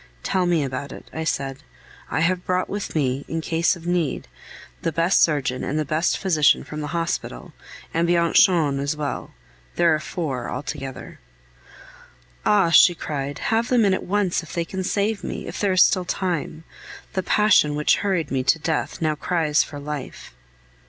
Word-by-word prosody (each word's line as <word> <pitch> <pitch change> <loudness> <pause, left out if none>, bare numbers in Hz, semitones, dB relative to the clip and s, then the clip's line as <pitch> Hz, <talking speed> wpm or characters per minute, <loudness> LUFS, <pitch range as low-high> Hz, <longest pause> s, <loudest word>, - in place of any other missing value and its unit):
"Tell 185 -2 +1
me 170 -4 +2
about 135 +1 -4
it," - - -11
I 160 - -3
said. 135 -3 -2 0.5
"I - - -1
have 180 +2 +1
brought 185 0 0
with 205 -3 -5
me, 135 -2 0
in 165 - -3
case 165 +2 +1
of 170 -1 -13
need, 175 - -1 0.5
the 165 - -1
best 165 +4 +2
surgeon 135 -5 +1
and 145 - -2
the 155 - 0
best 155 +4 0
physician 160 -7 +3
from 150 0 -7
the 150 - -4
hospital, 165 - -4 0.4
and 165 +1 +1
Bianchon 170 -3 +3
as 140 +2 -1
well; 150 -2 -4 0.4
there 170 -2 +4
are 155 - +1
four 140 -7 -4
altogether." 135 -2 -6 1.3
"Ah!" 200 -5 +4
she 175 +1 +7
cried, 140 -3 -4 0.2
"have 230 +1 +2
them 245 -4 +3
in 195 - +3
at - - -1
once 195 -3 0
if 165 - -11
they 170 -1 -1
can 190 +2 -4
save 200 +1 -1
me, - - -5
if - - -6
there 200 -2 +1
is 185 - +7
still 185 - +2
time. 175 -4 -3 0.5
The 190 - 0
passion 185 -6 +3
which 150 0 +3
hurried 185 -7 -1
me 135 -1 +1
to 135 - +3
death 160 +1 -2
now 155 -1 +2
cries 155 -1 +1
for 145 - -9
life!" 145 -2 -7
165 Hz, 180 wpm, -23 LUFS, 145-180 Hz, 1.3 s, she